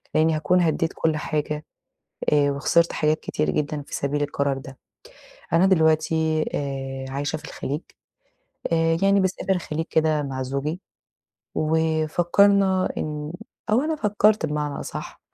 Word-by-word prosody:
لأني 160 Hz, 0 st, +3 dB
هاكون 160 Hz, +4 st, +2 dB
هدّيت 165 Hz, -1 st, +1 dB
كل 160 Hz, -1 st, +1 dB
حاجة، 150 Hz, 0 st, -2 dB, 0.7 s
آآ 145 Hz, -1 st, +4 dB
وخسرت 165 Hz, +4 st, +2 dB
حاجات 155 Hz, 0 st, +1 dB
كتير 155 Hz, -, -2 dB
جدًا 150 Hz, 0 st, -1 dB
في -, -, -7 dB
سبيل 145 Hz, +1 st, -1 dB
القرار 140 Hz, -1 st, -1 dB
ده. 135 Hz, 0 st, -10 dB, 0.8 s
أنا 170 Hz, +3 st, +5 dB
دلوقتي، 160 Hz, -2 st, +2 dB
آآ، 135 Hz, -1 st, -4 dB
عايشة 145 Hz, +3 st, -2 dB
في -, -, -12 dB
الخليج، 145 Hz, +3 st, -4 dB, 0.9 s
آآ 165 Hz, 0 st, +2 dB
يعني 195 Hz, 0 st, +4 dB
باسافر 190 Hz, +1 st, 0 dB
الخليج 165 Hz, -3 st, -2 dB
كده 155 Hz, -1 st, +2 dB
مع 135 Hz, -2 st, -4 dB
زوجي، 140 Hz, +6 st, -3 dB, 0.7 s
وفكرنا 175 Hz, +5 st, +2 dB
إن 150 Hz, 0 st, -4 dB, 0.4 s
أو 220 Hz, +4 st, +4 dB
أنا 310 Hz, +2 st, -1 dB
فكرت 210 Hz, -, +2 dB
بمعنى 150 Hz, -1 st, -3 dB
أصح -, -, -7 dB
155 Hz, 135 wpm, -24 LUFS, 145-170 Hz, 0.9 s, أنا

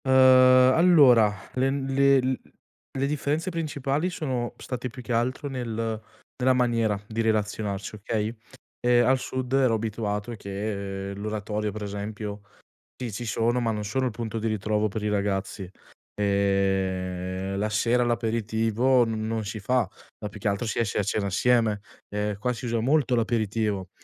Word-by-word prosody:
Uhm, -, -, -2 dB, 0.6 s
allora 140 Hz, -11 st, +6 dB, 0.2 s
len 135 Hz, +1 st, 0 dB
le 140 Hz, 0 st, +5 dB
l 130 Hz, 0 st, -1 dB, 0.6 s
le 135 Hz, +1 st, 0 dB
differenze 150 Hz, +3 st, -1 dB
principali 155 Hz, -1 st, -1 dB
sono 130 Hz, -8 st, -3 dB
state 125 Hz, -1 st, -5 dB
più 125 Hz, -, -10 dB
che 120 Hz, -1 st, -3 dB
altro 130 Hz, +5 st, -1 dB
nel 115 Hz, -4 st, -3 dB, 0.4 s
nella 130 Hz, 0 st, +3 dB
maniera 115 Hz, -5 st, +1 dB
di 115 Hz, +1 st, -2 dB
relazionarci, 105 Hz, -2 st, -1 dB
okay, 110 Hz, +2 st, -3 dB, 0.4 s
ehm, 120 Hz, 0 st, +4 dB
al 130 Hz, +1 st, +3 dB
sud 130 Hz, 0 st, -4 dB
ero 130 Hz, -4 st, +4 dB
abituato 105 Hz, -1 st, -3 dB
che 100 Hz, -1 st, -4 dB
l'oratorio 105 Hz, 0 st, -3 dB
per 105 Hz, +1 st, -6 dB
esempio, 105 Hz, 0 st, -5 dB, 0.6 s
sì 125 Hz, -3 st, -5 dB
ci 120 Hz, +5 st, -5 dB
sono, 115 Hz, +2 st, +1 dB
ma 115 Hz, -1 st, 0 dB
non 105 Hz, -1 st, -3 dB
sono 130 Hz, +6 st, -1 dB
il -, -, 0 dB
punto 115 Hz, 0 st, -4 dB
di 115 Hz, -, -1 dB
ritrovo 105 Hz, 0 st, 0 dB
per 105 Hz, +1 st, -5 dB
i -, -, +1 dB
ragazzi. 100 Hz, -1 st, -2 dB, 0.5 s
Ehm, 95 Hz, -2 st, 0 dB
la 105 Hz, +2 st, 0 dB
sera 115 Hz, +4 st, +2 dB
l'aperitivo 115 Hz, +1 st, +1 dB
n 110 Hz, -1 st, -3 dB
non 110 Hz, -1 st, -2 dB
si 105 Hz, +2 st, -5 dB
fa, 125 Hz, +2 st, +1 dB, 0.3 s
ma 105 Hz, -, -5 dB
più 105 Hz, +1 st, -11 dB
che 100 Hz, -, 0 dB
altro 100 Hz, +4 st, -1 dB
si 110 Hz, -, -2 dB
esce 110 Hz, -4 st, -1 dB
a -, -, +2 dB
cena 100 Hz, +1 st, -1 dB
assieme. 110 Hz, +1 st, +2 dB, 0.3 s
Ehm, 105 Hz, 0 st, -2 dB
qua 125 Hz, +4 st, 0 dB
si 125 Hz, -, -8 dB
usa 115 Hz, -1 st, 0 dB
molto 130 Hz, +1 st, +2 dB
l'aperitivo, 110 Hz, -4 st, 0 dB
110 Hz, 160 wpm, -26 LUFS, 105-125 Hz, 0.6 s, allora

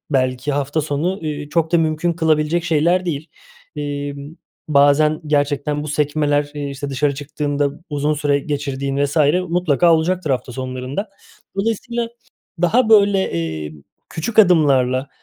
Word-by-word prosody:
belki 130 Hz, +1 st, 0 dB
hafta 145 Hz, +2 st, -1 dB
sonu, 155 Hz, +6 st, -2 dB
eee, 150 Hz, -2 st, -4 dB
çok 165 Hz, +1 st, 0 dB
da 170 Hz, -, +5 dB
mümkün 160 Hz, +1 st, 0 dB
kılabilecek 160 Hz, 0 st, +1 dB
şeyler 170 Hz, +3 st, +2 dB
değil. 155 Hz, -1 st, -3 dB, 0.5 s
Emm, 145 Hz, +1 st, -5 dB, 0.3 s
bazen 150 Hz, +2 st, +4 dB
gerçekten 145 Hz, 0 st, 0 dB
bu 150 Hz, -, -6 dB
sekmeler, 145 Hz, 0 st, 0 dB
eee, 145 Hz, -1 st, -4 dB
işte, 140 Hz, +1 st, -5 dB
dışarı 140 Hz, +1 st, 0 dB
çıktığında 145 Hz, 0 st, -2 dB, 0.2 s
uzun 145 Hz, +1 st, 0 dB
süre 145 Hz, -1 st, +1 dB
geçirdiğin 140 Hz, -1 st, -3 dB
vs. 145 Hz, +2 st, -4 dB, 0.3 s
mutlaka 170 Hz, -1 st, +3 dB
olacaktır 165 Hz, 0 st, 0 dB
hafta 130 Hz, -1 st, -2 dB
sonlarında. 130 Hz, -, -4 dB, 0.5 s
Dolayısıyla 230 Hz, +3 st, -2 dB, 0.5 s
daha, 225 Hz, +7 st, +3 dB
böyle, 200 Hz, -3 st, +4 dB
eee, 80 Hz, -2 st, -3 dB, 0.4 s
küçük 210 Hz, +8 st, -4 dB
adımlarla, 140 Hz, -9 st, +4 dB
150 Hz, 130 wpm, -19 LUFS, 140-165 Hz, 0.5 s, da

